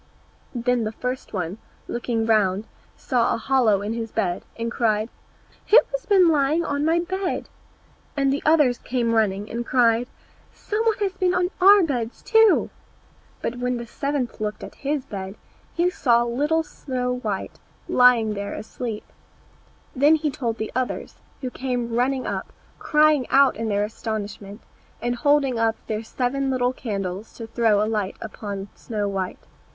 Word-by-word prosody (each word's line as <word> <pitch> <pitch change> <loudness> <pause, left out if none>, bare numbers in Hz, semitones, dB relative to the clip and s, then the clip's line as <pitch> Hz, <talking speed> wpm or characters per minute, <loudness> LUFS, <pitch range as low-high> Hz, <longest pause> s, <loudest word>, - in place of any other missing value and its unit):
Then 245 0 +1
the 215 - -2
first 250 +3 -5
one, 185 +1 -3 0.3
looking 235 -1 -1
round, 210 -2 +2 0.3
saw 245 -3 +1
a - - -3
hollow 230 -5 +2
in 210 +2 -2
his 225 -1 -4
bed, 180 -6 -1 0.2
and 230 0 -3
cried, 220 -2 +1 0.6
"Who 440 - +7
has - - -4
been 385 -4 +6
lying 310 +1 +2
on 285 0 -1
my 325 +2 +3
bed?" 375 +1 -3 0.7
And 275 -1 +2
the 285 - -2
others 295 -6 +4
came 240 -2 -1
running, 205 -2 +1
and 235 +1 -2
cried, 240 -1 +3 0.5
"Some 430 +2 -2
one 445 -2 +2
has 395 -2 +1
been 370 -1 +1
on 360 +1 +1
our 400 +1 +8
beds 245 -7 -3
too!" 445 -2 +4 0.7
But 245 +1 -3
when 250 0 -1
the 235 - -6
seventh 270 -1 -3
looked 210 0 -3
at - - -8
his 285 -1 -3
bed, 195 -3 -6 0.4
he 350 +1 +2
saw 240 -8 +3
little 295 +7 +1
Snow 250 -4 -3
white 210 -6 -4 0.3
lying 240 -4 +5
there 200 0 -4
asleep. 220 0 -5 0.9
Then 290 +4 +5
he 305 -1 -1
told 240 -6 -3
the 220 -1 -4
others, 255 -1 -3 0.2
who 255 -2 -4
came 245 -3 -3
running 255 +2 +1
up, - - -4 0.3
crying 300 -3 +3
out 275 0 +5
in 225 +1 -3
their 205 0 +1
astonishment, 210 -1 -5 0.4
and 240 0 -1
holding 275 -2 +2
up 225 0 +2
their 215 0 -2
seven 260 +4 -1
little 255 -1 +1
candles 200 -4 -4
to 230 - -7
throw 225 -2 +2
a - - +1
light 210 -3 -2
upon 205 -3 -6
Snow 210 -3 -3
white. 190 -2 -3
240 Hz, 160 wpm, -23 LUFS, 220-280 Hz, 0.9 s, our